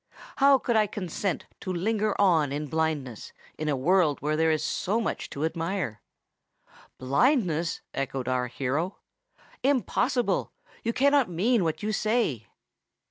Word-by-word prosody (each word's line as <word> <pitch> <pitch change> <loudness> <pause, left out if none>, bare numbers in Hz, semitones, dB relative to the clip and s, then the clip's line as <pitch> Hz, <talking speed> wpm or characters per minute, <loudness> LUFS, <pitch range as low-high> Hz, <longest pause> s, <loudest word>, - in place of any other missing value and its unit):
How 275 0 +6
could 240 -2 -1
I 215 -1 +4
consent 190 -1 -3
to 185 - -4
linger 210 +4 0
on 165 -8 +4
in 145 +2 -2
blindness 150 -6 -2 0.2
in 155 0 -3
a 145 - +1
world 160 +2 +2
where 150 +1 -1
there 160 +1 +2
is 155 -1 +1
so 200 +7 0
much 225 - -3
to 145 +3 -2
admire?" 165 - -3 1.0
"Blindness!" 170 - +1
echoed 135 -2 -3
our 125 -1 0
hero: 140 +9 -2 0.6
"impossible! 255 -1 +1 0.3
You 230 - -1
cannot 280 0 +3
mean 200 +6 +2
what 160 +4 -2
you 215 - 0
say!" 215 - 0
170 Hz, 135 wpm, -27 LUFS, 145-215 Hz, 1.0 s, How